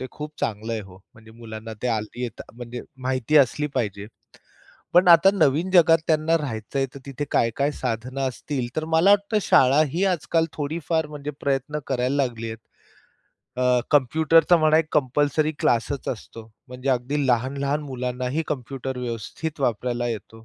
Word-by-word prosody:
ते 130 Hz, -, -4 dB
खूप 150 Hz, 0 st, -8 dB
चांगलं 110 Hz, +1 st, -2 dB
आहे 110 Hz, -, -2 dB
हो. 95 Hz, -2 st, -13 dB, 0.2 s
म्हणजे 110 Hz, 0 st, -16 dB
मुलांना 110 Hz, -1 st, -9 dB
ते 125 Hz, -, 0 dB
हल्ली 110 Hz, +2 st, -3 dB
येत 120 Hz, -, -5 dB
म्हणजे 120 Hz, +1 st, -7 dB, 0.2 s
माहिती 130 Hz, +3 st, 0 dB
असली 145 Hz, +2 st, +3 dB
पाहिजे. 105 Hz, -5 st, -2 dB, 0.9 s
पण 180 Hz, +1 st, +6 dB
आता 170 Hz, +3 st, +8 dB
नवीन 165 Hz, 0 st, +2 dB
जगात 165 Hz, -3 st, +6 dB
त्यांना 160 Hz, +1 st, +2 dB
राहायचं 130 Hz, -3 st, -5 dB
आहे, 135 Hz, -, +1 dB
तर 140 Hz, -, -9 dB
तिथे 140 Hz, +1 st, -4 dB
काय-काय 130 Hz, +5 st, +1 dB
साधनं 125 Hz, +1 st, -4 dB
असतील, 130 Hz, 0 st, -4 dB
तर 155 Hz, -, -1 dB
मला 170 Hz, +5 st, +5 dB
वाटतं 205 Hz, +1 st, +3 dB
शाळा 145 Hz, -4 st, +5 dB
ही 175 Hz, +8 st, -1 dB
आजकाल 165 Hz, 0 st, 0 dB
थोडीफार 160 Hz, +1 st, -2 dB
म्हणजे 150 Hz, -1 st, -6 dB
प्रयत्न 140 Hz, +2 st, -1 dB
करायला 130 Hz, +1 st, 0 dB
लागली 115 Hz, -2 st, -5 dB
आहे. 110 Hz, -, -6 dB, 1.1 s
अ, 125 Hz, -1 st, +3 dB
कम्प्युटरचा 160 Hz, +5 st, +4 dB
म्हणा, 155 Hz, 0 st, +4 dB
एक 160 Hz, -, +1 dB
कंपल्सरी 145 Hz, +2 st, +1 dB
क्लासच 120 Hz, +3 st, 0 dB
असतो. 115 Hz, -1 st, -7 dB, 0.2 s
म्हणजे 125 Hz, +2 st, -6 dB
अगदी 135 Hz, +3 st, 0 dB
लहान-लहान 140 Hz, +4 st, 0 dB
मुलांनाही 125 Hz, +2 st, -3 dB
कम्प्युटर 130 Hz, -1 st, -4 dB
व्यवस्थित 125 Hz, +6 st, -5 dB
वापरायला 120 Hz, 0 st, -1 dB
येतो. 115 Hz, 0 st, -7 dB
135 Hz, 155 wpm, -24 LUFS, 120-155 Hz, 1.1 s, आता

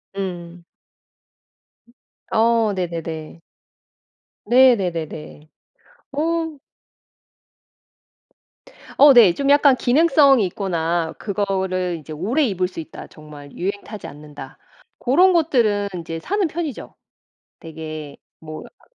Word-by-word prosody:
음. 175 Hz, -3 st, -6 dB, 1.2 s
음 235 Hz, -, -25 dB, 0.4 s
어. 225 Hz, -2 st, +3 dB
네네네. 165 Hz, -2 st, -5 dB, 1.1 s
네. 250 Hz, +2 st, +6 dB
네네네. 160 Hz, -5 st, -6 dB, 0.7 s
어. 320 Hz, 0 st, -2 dB, 2.4 s
어. 285 Hz, 0 st, +8 dB
네. 220 Hz, -8 st, +7 dB
좀 280 Hz, +6 st, -2 dB
약간 285 Hz, -2 st, +5 dB
기능성이 275 Hz, -, +4 dB
있거나 170 Hz, -3 st, -2 dB
그거를 190 Hz, -3 st, -2 dB
이제 155 Hz, +1 st, -10 dB
오래 220 Hz, -, 0 dB
입을 185 Hz, -4 st, -1 dB
수 180 Hz, -, -10 dB
있다. 160 Hz, -, -9 dB
정말 150 Hz, -2 st, -13 dB
유행 200 Hz, +3 st, -4 dB
타지 215 Hz, -1 st, -9 dB
않는다. 145 Hz, -2 st, -11 dB, 0.4 s
고런 355 Hz, +9 st, +4 dB
것들은 235 Hz, -11 st, +1 dB
이제 165 Hz, 0 st, -6 dB
사는 400 Hz, -, -1 dB
편이죠. 310 Hz, -5 st, -6 dB, 0.7 s
되게 155 Hz, -3 st, -8 dB, 0.2 s
뭐 155 Hz, -1 st, -9 dB
아 -, -, -19 dB
195 Hz, 190 characters per minute, -21 LUFS, 165-260 Hz, 2.4 s, 어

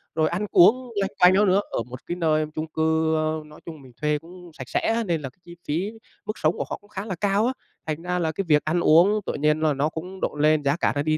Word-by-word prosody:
rồi 155 Hz, -1 st, +2 dB
ăn 190 Hz, +5 st, -2 dB
uống 245 Hz, +7 st, +5 dB
loanh 195 Hz, -, -1 dB
quanh 180 Hz, +1 st, +7 dB
đó 205 Hz, +2 st, +4 dB
nữa, 195 Hz, +2 st, +3 dB
ở 115 Hz, -, -1 dB
một 125 Hz, +2 st, -10 dB
cái 175 Hz, -, -3 dB
nơi 155 Hz, -3 st, +1 dB
chung 155 Hz, +1 st, -3 dB
cư, 160 Hz, 0 st, +1 dB
ơ, 155 Hz, 0 st, -1 dB
nói 150 Hz, 0 st, -15 dB
chung 160 Hz, -4 st, -9 dB
mình 130 Hz, -, -15 dB
thuê 150 Hz, 0 st, +1 dB
cũng 175 Hz, +1 st, -14 dB
sạch 130 Hz, -4 st, -9 dB
sẽ -, -, +1 dB
á. 230 Hz, +1 st, 0 dB
Nên 170 Hz, -6 st, -1 dB
là 135 Hz, -, -5 dB
cái 130 Hz, -, -31 dB
chi 170 Hz, 0 st, -11 dB
phí, 175 Hz, +8 st, -1 dB, 0.3 s
mức 215 Hz, -, -3 dB
sống 155 Hz, +2 st, +1 dB
của -, -, -2 dB
họ -, -, -4 dB
cũng 205 Hz, -, -23 dB
khá 195 Hz, +2 st, -6 dB
là 190 Hz, -4 st, -4 dB
cao 205 Hz, +4 st, +1 dB
á, 255 Hz, -, 0 dB, 0.3 s
thành 155 Hz, +1 st, -3 dB
ra 180 Hz, 0 st, -2 dB
là 160 Hz, -2 st, 0 dB
cái 195 Hz, +5 st, -3 dB
việc 150 Hz, -2 st, +4 dB
ăn 165 Hz, +3 st, +1 dB
uống 175 Hz, +6 st, +5 dB
tự -, -, -2 dB
nhiên 150 Hz, +1 st, +1 dB
là 155 Hz, -2 st, +2 dB
nó 145 Hz, +3 st, 0 dB
cũng 180 Hz, +4 st, -8 dB
độn 150 Hz, -, -2 dB
lên, 155 Hz, 0 st, +3 dB
giá 140 Hz, +1 st, +2 dB
cả -, -, +1 dB
nó 145 Hz, -, 0 dB
đi 155 Hz, 0 st, +1 dB
160 Hz, 290 wpm, -24 LUFS, 155-185 Hz, 0.3 s, quanh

